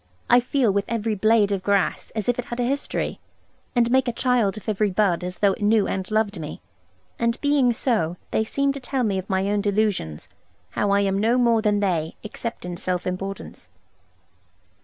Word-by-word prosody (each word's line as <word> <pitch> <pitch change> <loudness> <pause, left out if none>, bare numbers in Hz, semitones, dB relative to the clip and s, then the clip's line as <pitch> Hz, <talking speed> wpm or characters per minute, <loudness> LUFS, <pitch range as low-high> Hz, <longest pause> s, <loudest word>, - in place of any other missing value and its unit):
I 245 - +8
feel 245 -2 +1
with 200 0 0
every 225 -1 -1
blade 215 0 +3
of 195 -2 0
grass, 200 0 0
as 215 -3 -2
if 245 0 +1
it 245 - -2
had 240 - -6
a - - +2
history; 275 +4 -2 0.6
and 240 -1 +3
make 260 0 +3
a - - +1
child 235 -4 +1
of 215 - -10
every 210 -1 +1
bud 180 -3 +1
as 180 0 -5
though 200 -1 +3
it - - -9
knew 210 0 +3
and 190 -1 -3
loved 215 -3 0
me. 150 -1 -6 0.6
And 235 0 0
being 285 -4 +3
so, 215 -8 0
they 220 - +2
seem 275 +5 0
to 280 - -6
tell 260 0 -2
me 200 -4 0
of 190 - -9
my 190 0 +1
own 205 0 +1
delusions, 200 - -1 0.4
how 205 - 0
I 200 0 +3
am 195 -1 +1
no 230 +4 +3
more 235 -3 +3
than 210 -1 +1
they, 170 -5 0
except 225 -1 -6
in 175 -1 -5
self 180 0 -2
importance. 195 +2 -5
210 Hz, 200 wpm, -23 LUFS, 195-235 Hz, 0.6 s, I